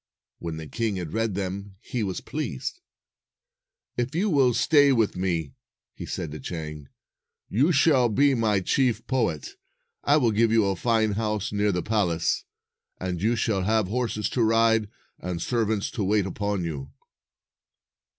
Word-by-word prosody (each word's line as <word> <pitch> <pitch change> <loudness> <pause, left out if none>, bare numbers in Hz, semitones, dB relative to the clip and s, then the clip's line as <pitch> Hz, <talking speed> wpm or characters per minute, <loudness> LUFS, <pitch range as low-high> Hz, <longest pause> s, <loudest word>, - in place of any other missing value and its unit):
When 80 -2 -5
the 80 - -6
king 110 +5 -2
had 90 -4 -5
read 110 -3 0
them, 100 0 -4
he 120 +2 -4
was 95 -4 -2
pleased. 150 - -4 0.6
" - - -55
If 120 +4 -1
you 195 +4 +1
will 130 -5 +4
stay 145 -3 +5
with 115 -5 +2
me," 85 -6 -1 0.4
he - - -8
said 85 -5 -4
to 75 - -7
Chang, 75 -1 -6 0.6
"you 140 - +3
shall 140 -5 +4
be 140 +6 +3
my 110 -5 +2
chief 120 +2 +1
poet. 110 - -1 0.5
I 145 - +4
will 120 -6 +3
give 110 +1 +3
you 115 -2 +4
a 100 -1 +1
fine 110 +2 +1
house 105 0 -1
near 105 0 +1
the 90 -2 -1
palace, 90 -7 0 0.5
and 90 -2 -3
you 115 +4 +2
shall 110 -4 0
have 110 0 +1
horses 115 -2 -1
to 125 - 0
ride, 115 -1 +3 0.3
and 90 -1 -4
servants 110 0 0
to 110 - -2
wait 100 0 +2
upon 100 0 -2
you." 70 -5 -5
110 Hz, 160 wpm, -26 LUFS, 95-120 Hz, 0.6 s, stay